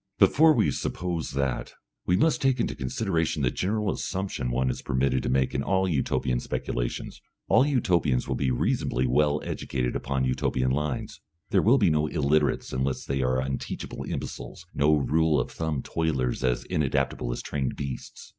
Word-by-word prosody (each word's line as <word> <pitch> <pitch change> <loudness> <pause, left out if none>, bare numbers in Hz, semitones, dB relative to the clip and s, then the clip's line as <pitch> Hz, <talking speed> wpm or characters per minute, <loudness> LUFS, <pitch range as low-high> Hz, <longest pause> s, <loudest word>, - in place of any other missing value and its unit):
Before 160 +2 +6
we - - +3
suppose 85 -3 -3
that, 65 -2 -2 0.3
we 90 - +3
must 160 +9 +2
take 135 -2 +2
into - - 0
consideration 75 +4 -1
the 60 - +2
general 105 +2 0
assumption 95 -9 -3
one 65 +1 +1
is - - -6
permitted 65 0 +1
to - - -2
make 65 0 +1
in 65 - 0
all 95 +4 +1
Utopian 65 -5 0
speculations. - - -4 0.3
All 130 - +5
Utopians 90 - +1
will - - -1
be 65 - 0
reasonably 65 0 0
well 75 +4 +2
educated 60 -2 -2
upon 65 0 -1
Utopian 65 0 0
lines; 75 0 -2 0.3
there - - +4
will 120 +6 +5
be 100 -9 +4
no 75 0 +2
illiterates 75 -2 +1
unless 65 +1 -1
they 70 0 -1
are 65 0 +1
unteachable 65 0 -4
imbeciles, - - -6
no 75 +2 +4
rule 75 +2 +2
of - - -2
thumb 80 -4 -2
toilers 65 -7 -1
as 60 -2 +1
inadaptable 70 -4 0
as - - -4
trained 70 -3 -2
beasts. 70 -3 -7
70 Hz, 165 wpm, -27 LUFS, 65-80 Hz, 0.3 s, Before